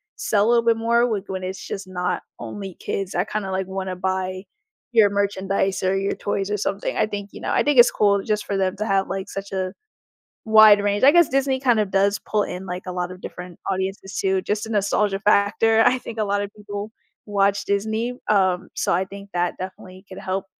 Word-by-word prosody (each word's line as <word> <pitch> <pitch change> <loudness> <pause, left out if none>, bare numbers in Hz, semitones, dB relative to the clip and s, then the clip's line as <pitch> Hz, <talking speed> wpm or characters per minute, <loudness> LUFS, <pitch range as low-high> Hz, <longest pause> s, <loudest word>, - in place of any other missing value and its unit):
sell 205 -1 +1
a - - +3
little 235 -1 +3
bit 230 - +4
more 235 +1 +2
with 205 -4 -2
when 190 -1 -4
it's 190 +1 -6
just 195 -1 -6
not 180 -1 -2 0.2
only 195 -3 -7
kids. 195 -2 -4
I 180 - +2
kinda 210 -2 -4
like, 190 0 -2
want 190 0 -4
to 185 - -3
buy 185 0 -2 0.5
your 220 -4 +5
merchandise 195 -1 0
or 190 +1 +1
your 195 +1 -1
toys 200 0 -3
or 210 - 0
something, 200 0 -2
I - - +3
think 205 -1 -5
you - - -10
know, - - -3
I - - +3
think 290 -4 +3
it's 240 - +9
cool 200 -1 +2
just 210 -1 -1
for 200 - -2
them 190 -1 0
to 215 - -2
have, 195 -2 +1
like, 195 0 -4
such 195 0 -6
a 185 -1 -2 0.7
wide 215 -1 +8
range. 205 +3 +1
I 280 - +9
guess 345 -2 +5
Disney 270 0 +1
kind 240 -5 +3
of 200 -2 -1
does 200 0 +2
pull 210 -1 0
in, 180 +1 -6
like, 180 +1 -5
a 180 - -4
lot 180 0 -3
of 185 - -12
different 180 -1 -9
audiences 190 +1 -3
too, 190 -1 +1
just 210 +1 -2
a - - -8
nostalgia 205 -1 +1
factor, 220 +2 +3
I 255 - +4
think 230 -2 -9
a 215 - +1
lot 200 0 0
of 200 - -5
people 205 +1 -6 0.3
watch 200 -1 +1
Disney, 220 +4 -1 0.2
um, 185 -3 +2
so, - - 0
I 185 +2 +1
think 200 +1 -11
that 175 0 0
definitely 185 +1 -9
could 190 - -10
help 190 +1 -3
200 Hz, 225 wpm, -22 LUFS, 190-215 Hz, 0.7 s, it's